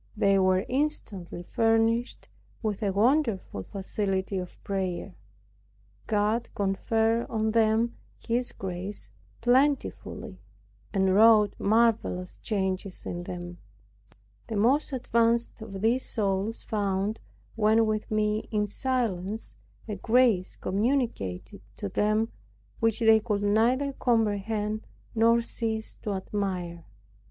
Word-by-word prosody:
They 195 -2 +4
were 185 0 +3
instantly 230 - -2
furnished 225 +4 +1 0.4
with 210 -3 -2
a 200 -2 +1
wonderful 225 - +1
facility 195 - -2
of 180 -1 -8
prayer. 190 -1 -3 0.9
God 215 +2 +1
conferred 225 +4 +1
on 220 -1 0
them 225 +1 +2 0.2
His 240 +2 -1
grace 190 - -6 0.3
plentifully, 245 -5 0 0.5
and 190 -1 +2
wrought 215 0 +6
marvelous 215 -4 +1
changes 190 -2 -2
in 175 0 -4
them. 175 0 -7 0.9
The 225 - -4
most 255 +9 +2
advanced 235 -3 +1
of 195 -3 -7
these 240 +4 +2
souls 200 +1 -1
found, 200 0 -1 0.4
when 220 +1 +4
with 215 -1 -2
me, 215 0 0
in 210 -1 +1
silence, 215 - -2 0.3
a 210 - -4
grace 225 -4 +3
communicated 190 - -1
to 100 - -4
them 215 - +1 0.5
which 225 0 +1
they 225 -1 +6
could 210 -2 -1
neither 240 +7 +2
comprehend, 215 -2 0 0.3
nor 230 +1 +4
cease 220 -1 -3
to 210 - -2
admire. 185 -3 -3
215 Hz, 110 wpm, -27 LUFS, 195-230 Hz, 0.9 s, wrought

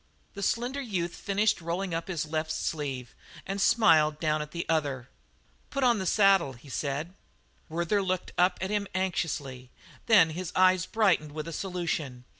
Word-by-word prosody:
The 200 - -7
slender 245 +7 -1
youth 180 -9 -2
finished 205 -1 0
rolling 175 +2 -3
up 165 0 -3
his 170 -5 -2
left 155 0 -2
sleeve 140 -6 -3 0.3
and 195 +1 -3
smiled 155 -9 +4
down 155 -1 0
at 150 - -6
the 170 +1 -5
other. 140 -6 -1 0.6
"Put 275 -1 -2
on 240 -3 +4
the 190 - -2
saddle," 195 -8 +4
he 130 +3 -15
said. 145 +5 -3 0.6
Werther 170 +5 0
looked 185 -1 -2
at 180 +1 +2
him 205 -1 0
anxiously; 145 -9 -2 0.4
then 185 -8 +6
his 175 +2 -5
eyes 185 0 +4
brightened 185 -9 +2
with 155 +1 -5
a 165 - -5
solution. 165 -9 -3
170 Hz, 160 wpm, -28 LUFS, 150-195 Hz, 0.6 s, then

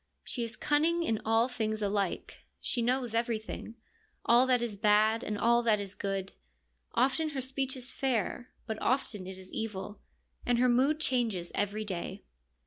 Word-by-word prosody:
She 240 - -3
is 230 -1 -4
cunning 320 +7 +2
in 225 -9 0
all 225 +2 +4
things 220 -3 -2
alike; 200 -2 -2
she 240 - -1
knows 245 0 0
everything, 230 -1 -2 0.5
all 240 +2 +6
that 250 -1 +4
is 230 -4 -3
bad 215 +2 +3
and 210 - -2
all 235 +2 +4
that 220 -3 +3
is 200 -1 -5
good; 195 -1 -3 0.6
often 270 +6 +2
her 285 -3 -4
speech 265 0 -2
is 255 +1 -4
fair, 245 -1 -1 0.2
but 220 -2 -4
often 220 -7 0
it 190 0 -7
is 190 0 -12
evil, 210 -2 -4 0.4
and 245 -1 +2
her 250 +1 +4
mood 270 +6 +3
changes 230 - 0
every 205 +1 -1
day. 190 0 -4
230 Hz, 165 wpm, -31 LUFS, 210-255 Hz, 0.6 s, all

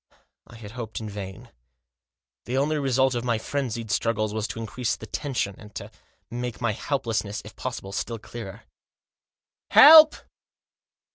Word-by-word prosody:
I - - -14
had 110 -3 -10
hoped 115 -2 -6
in 110 - -6
vain. 100 -2 -8 0.9
The 125 +2 -2
only 150 +3 +1
result 130 -1 +2
of 120 -1 -2
my 120 -2 0
frenzied 115 -2 -4
struggles 110 -2 0
was 110 0 -2
to - - -7
increase 115 +1 -2
the - - -10
tension, 125 -4 -3
and 105 -1 -14
to - - -7 0.4
make 120 -1 -5
my 120 -2 0
helplessness, 110 -4 -3
if - - -12
possible, 95 - -6
still 115 +3 -3
clearer. 110 -1 -9 0.6
" - - -69
Help 310 +1 +9
115 Hz, 150 wpm, -25 LUFS, 110-125 Hz, 0.9 s, Help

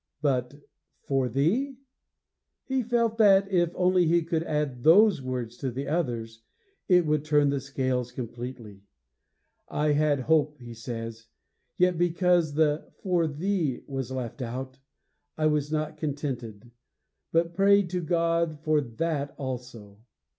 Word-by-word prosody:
But 130 -2 0 0.5
'for 135 -2 0
thee'; 220 - 0 0.9
he 265 -1 -1
felt 230 -1 0
that, 200 -2 +6
if 175 -2 +3
only 180 -1 +3
he 170 +1 +3
could 165 0 -1
add 150 -6 -2
those 195 +1 +6
words 125 -2 -4
to 130 - -3
the 135 +3 -5
others, 115 -8 -2 0.5
it 180 -3 +5
would 150 -1 +1
turn 145 -2 +3
the 140 - 0
scales 130 -2 -2
completely. 120 -4 -7 0.9
'I 150 0 +1
had 145 -1 +2
hope,' 150 +1 +2
he 120 -3 -10
says, 115 0 -7 0.5
'yet 180 -2 +2
because 175 -3 +2
the 150 -1 +1
"for 175 -4 +2
thee" 155 -2 -1
was 135 -3 -4
left 130 0 -5
out, 130 +2 -5 0.6
I 155 - 0
was 150 -1 +1
not 155 0 -2
contented, 125 -7 -5 0.6
but 165 +1 +1
prayed 200 0 +4
to 180 -1 -1
God 170 -1 0
for 155 -1 +2
that 145 +3 -3
also. 120 -6 -7
150 Hz, 135 wpm, -27 LUFS, 125-170 Hz, 0.9 s, that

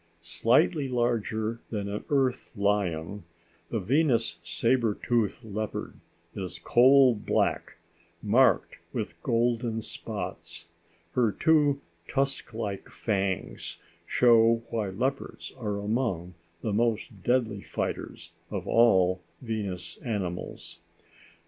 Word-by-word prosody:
Slightly 135 - +2
larger 115 -2 0
than 105 -3 -3
an 100 +1 -4
Earth 130 -5 0
lion, 100 -2 0 0.5
the 115 - -1
Venus 125 - +2
sabre 115 -3 +1
tooth 120 -1 0
leopard 110 0 -4 0.4
is 90 -2 -5
coal 130 +8 +6
black, 105 - -1 0.5
marked - - +3 0.2
with - - -4
golden 115 -1 0
spots. 85 -7 -6 0.4
Her 115 +2 +2
two 145 +1 +3 0.3
tusk 135 0 -1
like 105 -4 -4
fangs 95 -4 -2 0.3
show 115 -1 +5
why 110 -4 -1
leopards 130 +8 -3
are 105 -5 -3
among 100 -5 -1 0.3
the 110 - -1
most 110 -1 0
deadly 115 -3 +1
fighters - - -4 0.2
of - - -4
all 95 -6 +4 0.2
the - - -13
Venus 95 -5 -4
animals. 95 -7 -5
110 Hz, 105 wpm, -28 LUFS, 100-120 Hz, 0.5 s, coal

